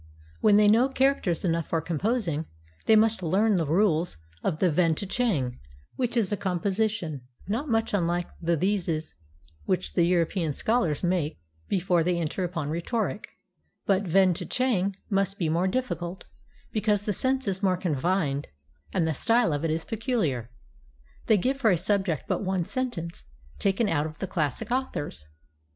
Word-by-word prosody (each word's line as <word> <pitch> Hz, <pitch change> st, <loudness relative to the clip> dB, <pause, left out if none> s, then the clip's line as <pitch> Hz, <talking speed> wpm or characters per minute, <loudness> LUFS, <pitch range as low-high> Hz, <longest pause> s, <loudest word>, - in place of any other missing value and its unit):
When 205 Hz, -, +5 dB
they 210 Hz, 0 st, +6 dB
know 230 Hz, +5 st, +5 dB
characters 265 Hz, -, +1 dB
enough 165 Hz, -2 st, 0 dB
for 165 Hz, -, 0 dB
composing, 170 Hz, -1 st, -1 dB, 0.4 s
they 220 Hz, -, +7 dB
must 220 Hz, -1 st, +3 dB
learn 195 Hz, +5 st, +2 dB
the 165 Hz, -3 st, 0 dB
rules 170 Hz, -, +2 dB, 0.3 s
of 170 Hz, -5 st, 0 dB
the 180 Hz, 0 st, +2 dB
"Ven 165 Hz, 0 st, +3 dB
tchang," 190 Hz, -, -1 dB, 0.4 s
which 245 Hz, -1 st, -1 dB
is 215 Hz, -4 st, +2 dB
a -, -, +2 dB
composition 190 Hz, -, -1 dB, 0.3 s
not 240 Hz, +9 st, -2 dB
much 225 Hz, -1 st, +1 dB
unlike 175 Hz, -2 st, 0 dB
the 170 Hz, 0 st, +1 dB
theses 170 Hz, -3 st, -1 dB, 0.5 s
which 75 Hz, -, -1 dB
the -, -, +3 dB
European 170 Hz, -2 st, +1 dB
scholars 190 Hz, -11 st, 0 dB
make 175 Hz, -, 0 dB, 0.3 s
before 180 Hz, -3 st, +2 dB
they 175 Hz, +1 st, +1 dB
enter 170 Hz, +3 st, -2 dB
upon 170 Hz, -5 st, -3 dB
rhetoric; 205 Hz, +5 st, -2 dB, 0.6 s
but 195 Hz, -1 st, +3 dB
"Ven 190 Hz, -1 st, +4 dB
tchang" 200 Hz, -1 st, 0 dB, 0.2 s
must 195 Hz, 0 st, +1 dB
be 165 Hz, -4 st, 0 dB
more 170 Hz, +4 st, +1 dB
difficult, 190 Hz, -6 st, -3 dB, 0.5 s
because 210 Hz, -2 st, +1 dB
the 210 Hz, -, 0 dB
sense 260 Hz, +4 st, 0 dB
is 190 Hz, 0 st, 0 dB
more 185 Hz, -2 st, +2 dB
confined 155 Hz, -3 st, 0 dB, 0.4 s
and 160 Hz, -, +1 dB
the 160 Hz, -, +1 dB
style 230 Hz, -, +2 dB
of 145 Hz, +1 st, -2 dB
it 165 Hz, -, +1 dB
is 160 Hz, +1 st, -1 dB
peculiar. 205 Hz, -, -1 dB, 0.8 s
They 220 Hz, -, +5 dB
give 260 Hz, +8 st, 0 dB
for 250 Hz, -5 st, +3 dB
a 180 Hz, -, +4 dB
subject 190 Hz, -3 st, 0 dB
but -, -, 0 dB
one 185 Hz, -2 st, 0 dB
sentence, 185 Hz, -, -4 dB, 0.3 s
taken 200 Hz, +3 st, +1 dB
out 150 Hz, -5 st, +1 dB
of 155 Hz, -, -10 dB
the -, -, -3 dB
classic 155 Hz, -, -2 dB
authors. 245 Hz, -, -3 dB
185 Hz, 160 wpm, -27 LUFS, 165-215 Hz, 0.8 s, they